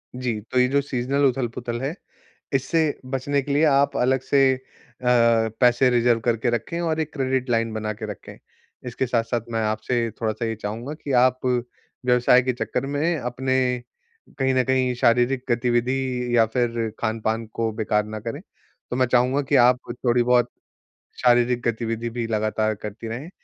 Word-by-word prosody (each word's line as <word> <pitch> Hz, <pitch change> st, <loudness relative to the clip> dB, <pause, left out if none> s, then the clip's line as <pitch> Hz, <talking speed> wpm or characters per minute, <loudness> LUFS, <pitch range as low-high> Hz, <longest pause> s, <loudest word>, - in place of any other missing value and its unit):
जी, 125 Hz, -4 st, -2 dB
तो 125 Hz, +4 st, -1 dB
ये 125 Hz, -, +4 dB
जो 140 Hz, +2 st, +2 dB
सीज़नल 135 Hz, +1 st, 0 dB
उथल-पुथल 120 Hz, -2 st, -2 dB
है, 135 Hz, +4 st, -2 dB, 0.6 s
इससे 135 Hz, +5 st, +1 dB, 0.3 s
बचने 140 Hz, +2 st, 0 dB
के 140 Hz, -, -4 dB
लिए 145 Hz, +3 st, +3 dB
आप 140 Hz, -2 st, +3 dB
अलग 130 Hz, +1 st, +2 dB
से 135 Hz, 0 st, +3 dB
अ, 125 Hz, -1 st, -14 dB, 0.5 s
पैसे 125 Hz, +1 st, +4 dB
रिज़र्व 120 Hz, -1 st, +3 dB
करके 120 Hz, 0 st, +1 dB
रखें 120 Hz, +9 st, -3 dB
और 160 Hz, -2 st, -1 dB
एक 155 Hz, -1 st, -3 dB
क्रेडिट 130 Hz, -2 st, -1 dB
लाइन 115 Hz, -1 st, +1 dB
बना 110 Hz, 0 st, -2 dB
के 110 Hz, +1 st, -7 dB
रखें। 100 Hz, -, -10 dB, 0.5 s
इसके 125 Hz, +2 st, -2 dB
साथ-साथ 115 Hz, 0 st, 0 dB
मैं 115 Hz, -, 0 dB
आपसे 110 Hz, +2 st, -1 dB
थोड़ा-सा 110 Hz, +1 st, -2 dB
ये 115 Hz, -, -2 dB
चाहूँगा 110 Hz, +7 st, -5 dB
कि 145 Hz, -3 st, -6 dB
आप 130 Hz, 0 st, +3 dB
व्यवसाय 125 Hz, 0 st, +1 dB
के 130 Hz, 0 st, 0 dB
चक्कर 130 Hz, +2 st, -3 dB
में 150 Hz, +4 st, 0 dB
अपने 130 Hz, +1 st, -1 dB, 0.8 s
कहीं 130 Hz, -1 st, +1 dB
न 130 Hz, -, +3 dB
कहीं 130 Hz, 0 st, +1 dB
शारीरिक 125 Hz, +2 st, +2 dB
गतिविधि 125 Hz, +1 st, 0 dB
या 115 Hz, -, +6 dB
फिर 115 Hz, -1 st, -1 dB
खान-पान 110 Hz, 0 st, -1 dB
को 115 Hz, -1 st, -1 dB
बेकार 105 Hz, -1 st, 0 dB
ना 110 Hz, 0 st, -7 dB
करें। 115 Hz, +2 st, -5 dB, 0.5 s
तो 125 Hz, -, -2 dB
मैं 130 Hz, 0 st, +3 dB
चाहूँगा 125 Hz, +3 st, +2 dB
कि, 140 Hz, +1 st, +1 dB
आप 125 Hz, 0 st, +5 dB, 0.3 s
थोड़ी-बहुत 120 Hz, 0 st, +3 dB, 0.7 s
शारीरिक 120 Hz, 0 st, +3 dB
गतिविधि 115 Hz, 0 st, -2 dB
भी 115 Hz, 0 st, -3 dB
लगातार 110 Hz, 0 st, 0 dB
करती 105 Hz, +2 st, -8 dB
रहें, 125 Hz, +9 st, -6 dB
125 Hz, 165 wpm, -23 LUFS, 115-130 Hz, 0.8 s, या